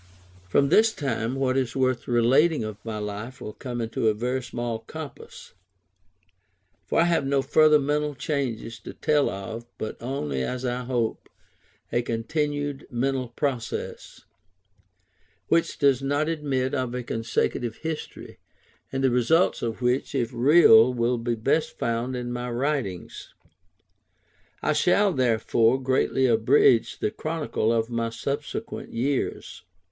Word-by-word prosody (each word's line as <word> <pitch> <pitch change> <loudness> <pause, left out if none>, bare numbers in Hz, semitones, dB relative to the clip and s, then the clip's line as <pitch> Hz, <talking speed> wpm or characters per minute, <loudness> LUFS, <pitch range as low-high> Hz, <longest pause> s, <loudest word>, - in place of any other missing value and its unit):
From 140 +9 +3
this 220 +7 +5
time, 135 - -2
what 135 -1 0
is 130 -3 -1
worth 130 -2 0
relating 130 +5 +3
of 110 -1 -7
my 110 -2 -4
life 105 +4 -6
will 105 - -7
come 125 -2 -6
into 115 0 -1
a 110 - +3
very 125 +4 -1
small 120 -2 -4
compass; 145 +4 -10 1.3
for - - +2
I - - +6
have 170 -3 +2
no 135 0 +1
further 155 +1 +5
mental 150 +1 -1
changes 125 -6 -3
to - - -10
tell 150 -2 +2
of, 110 +4 -6
but 110 - -5
only, 75 - -3
as 125 - -3
I 125 0 -2
hope, 120 -3 -2 0.6
a 120 - +1
continued 145 +4 -2
mental 130 +1 -1
progress; 120 0 -4 1.3
which 165 0 +2
does 140 -3 +3
not 145 +3 0
admit 140 -5 -1
of 130 -3 -2
a 125 - -3
consecutive 115 0 -1
history, 160 -1 -6 0.5
and 135 0 -2
the 130 - +4
results 125 +9 +2
of 115 +1 -3
which, 125 +3 0
if 120 -3 -1
real, 125 -3 +7
will 120 0 0
be 120 0 -1
best 135 +8 0
found 115 +2 -1
in 120 0 -4
my 120 0 -4
writings. 120 - -3 1.3
I - - +2
shall, 200 +2 +3
therefore, 120 -1 +2
greatly 130 0 +1
abridge 115 0 +4
the 105 - -1
chronicle 155 -8 -2
of 115 0 0
my 115 -1 -1
subsequent 145 - -5
years. 130 +4 -2
125 Hz, 140 wpm, -25 LUFS, 115-140 Hz, 1.3 s, real